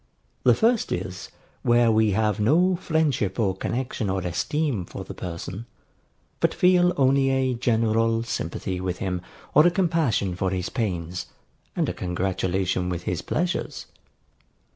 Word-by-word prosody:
The - - +5
first 230 0 +2
is, 90 0 -4 0.3
where 120 -1 +4
we 110 0 +3
have 105 +1 +1
no 175 - +3
friendship 155 - 0
or 95 -4 +1
connexion 120 0 -3
or 95 0 0
esteem 135 - -1
for - - -8
the - - -8
person, 90 +5 -6 0.7
but - - +1
feel 180 -1 +4
only 135 0 +3
a 130 -1 +1
general 115 -1 +1
sympathy 90 -4 -3
with 90 -1 -2
him 90 -2 -2 0.3
or 150 +4 +7
a - - +6
compassion 160 - +1
for 95 +1 0
his 90 -1 -2
pains, 90 -7 -3 0.5
and - - +1
a - - -2
congratulation 95 0 -1
with 90 -1 -3
his 90 -2 -2
pleasures. 180 +3 -2
110 Hz, 140 wpm, -25 LUFS, 95-135 Hz, 0.7 s, or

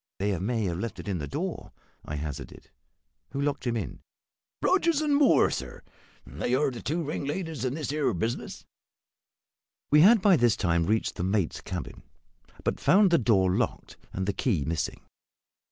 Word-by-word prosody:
"They 100 0 0
may 110 +4 -1
have 90 -3 -2
left 115 +2 -4
it - - -9
in 95 -4 -2
the 75 - -4
door," 70 - -5 0.3
I 75 - -5
hazarded. 75 -1 -7 0.6
"Who 140 - -3
locked 140 -2 -1
him 120 -1 0
in?" - - -5 0.6
"Rogers 340 -5 +3
and 300 -2 +2
Moore, 285 -2 +5
sir. - - -6 0.4
They 75 - -2
are 140 +1 +1
the 120 - -8
two 165 +3 -2
ringleaders 150 -1 -4
in 130 +1 -1
this 155 -3 -3
here 150 -1 +1
business." 110 +8 -4 1.3
We 150 +1 +7
had 220 +6 +7
by 190 -2 +5
this 120 -4 +3
time 85 -3 +1
reached 110 +2 0
the - - -2
mate's 95 -2 0
cabin; 90 -4 -6 0.6
but - - -1
found 195 0 +5
the 170 - +5
door 95 -6 +3
locked, - - -2 0.2
and 95 - -3
the 100 - 0
key 95 - 0
missing. 80 0 -3
120 Hz, 170 wpm, -27 LUFS, 95-155 Hz, 1.3 s, We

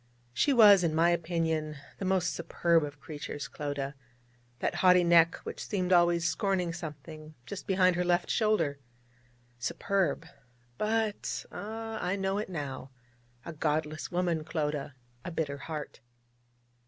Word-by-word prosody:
She 285 - +2
was, 205 -7 +8
in 160 -2 +1
my 170 +2 +4
opinion, 160 -3 -1 0.2
the 195 - -3
most 185 -2 +1
superb 170 -1 +1
of 145 0 -6
creatures, 145 0 -6
Clodagh 145 -1 -4 0.6
that - - -1
haughty 180 -1 +6
neck 170 -1 +5
which - - -6
seemed 185 -3 0
always 175 -1 +4
scorning 180 -1 0
something 155 -1 -9
just 195 +7 -7
behind 185 -2 +3
her 180 - +1
left 175 0 +1
shoulder. 215 -11 +1 0.8
Superb! 180 - 0 0.5
but 220 -1 -1
ah 225 +1 -5
I 180 +2 0
know 195 0 -1
it 210 - -4
now 140 -6 -5 0.6
a 170 - -6
godless 155 0 -2
woman, 175 -3 0
Clodagh, 150 -3 -3 0.3
a - - -5
bitter 155 -4 -2
heart. 150 +1 -6
170 Hz, 135 wpm, -30 LUFS, 155-185 Hz, 0.8 s, was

